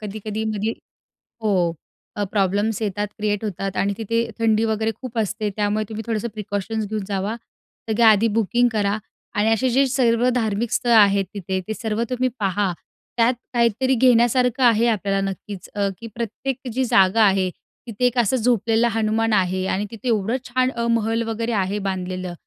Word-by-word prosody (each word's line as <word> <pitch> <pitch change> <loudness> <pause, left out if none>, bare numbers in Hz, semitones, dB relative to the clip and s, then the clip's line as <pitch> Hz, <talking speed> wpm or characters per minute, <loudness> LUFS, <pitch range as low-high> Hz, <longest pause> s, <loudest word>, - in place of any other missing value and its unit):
कधी-कधी 215 +1 -5
मध्ये 215 +2 -1 0.7
हो. 215 -2 +1 0.6
अ, 205 - -1
प्रॉब्लेम्स 205 +2 0
येतात, 205 -1 -1
क्रिएट 210 -1 -1
होतात 195 -2 -3
आणि 200 +1 +1
तिथे 230 +1 -1
थंडी 225 -1 +2
वगैरे 220 0 0
खूप 250 -3 -7
असते. 210 0 -1
त्यामुळे 210 0 0
तुम्ही 220 0 -5
थोडंसं 225 0 -1
प्रिकॉशन्स 210 +1 -3
घेऊन 215 -1 -3
जावा. 200 +2 -2 0.5
सगळ्या 225 +1 +4
आधी 215 +2 +3
बुकिंग 240 +3 +3
करा 205 -1 0 0.4
आणि 210 +2 +2
असे 240 +4 +2
जे 270 +3 +3
सर्व 245 -2 +2
धार्मिक 220 -1 -1
स्थळं 240 -1 +2
आहेत 200 -3 +5
तिथे, 190 -1 -3
ते 220 - -2
सर्व 220 0 -2
तुम्ही 255 0 0
पहा, 195 -1 0 0.5
त्यात 235 +2 +4 0.2
काहीतरी 240 +2 +2
घेण्यासारखं 250 +1 +3
आहे. 235 -1 +5
आपल्याला 195 -3 0
नक्कीच. 195 0 -8
अ, 200 -1 +1
की 230 - -8
प्रत्येक 235 +3 -3 0.2
जी 260 +1 +1
जागा 220 -2 +4
आहे 190 -2 +3 0.4
तिथे 230 +2 -1
एक 245 0 +1
असं 240 +2 +2
झोपलेला 230 0 +2
आहे 225 0 -1
हनुमान 220 +1 +1
आहे 185 -1 +1
आणि 200 +2 -1
तिथे 230 +2 -7
एवढं 225 +2 +1
छान 255 +1 +1 0.2
महल 230 0 +1
वगैरे 225 +1 -2
आहे 200 -1 0
बांधलेलं. 185 -1 -3
220 Hz, 170 wpm, -22 LUFS, 205-230 Hz, 0.7 s, आहेत